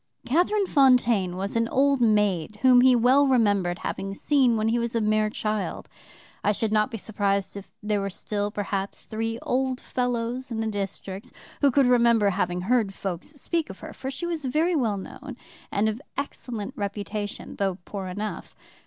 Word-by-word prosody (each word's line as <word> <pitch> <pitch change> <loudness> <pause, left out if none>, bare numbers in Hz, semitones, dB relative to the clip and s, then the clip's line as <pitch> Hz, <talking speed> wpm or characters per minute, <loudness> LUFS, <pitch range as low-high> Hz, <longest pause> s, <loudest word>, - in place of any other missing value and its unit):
"Catherine 360 - +2
Fontaine 245 - +3
was 195 +3 -3
an 230 0 +2
old 275 +1 +2
maid 210 -4 +2
whom 250 -1 +7
he 255 0 +6
well 255 +4 +5
remembered 205 -8 +2
having 195 0 -3
seen 255 -2 +3
when 215 +1 +1
he 235 +1 +1
was 235 0 -2
a - - +3
mere 215 0 +2
child. 215 -1 -3 0.6
I 210 - +3
should 215 +1 -1
not 215 0 +3
be 225 - -5
surprised 200 -2 -1
if 200 -1 -8
there 210 -1 0
were 195 - -2
still, 205 +1 -3
perhaps, 200 -1 -4
three 225 +1 -3
old 260 0 0
fellows 245 +1 -2
in 225 -2 -3
the 225 - -1
district 200 -1 -4 0.3
who 285 - +6
could 275 +1 +4
remember 235 -4 +4
having 180 -2 -1
heard 215 -1 +1
folks 180 -3 -4
speak 320 +2 -2
of 190 - -8
her, - - -8
for 265 - -5
she 270 +5 -5
was 335 -3 -3
very 315 +7 +1
well 225 -8 +1
known 260 +6 -8 0.3
and 205 +2 +1
of 220 +4 -2 0.2
excellent 250 -4 -4
reputation, 205 -1 -4
though 195 -2 0
poor 195 -2 -5
enough. 205 +4 -5
220 Hz, 180 wpm, -26 LUFS, 200-255 Hz, 0.6 s, whom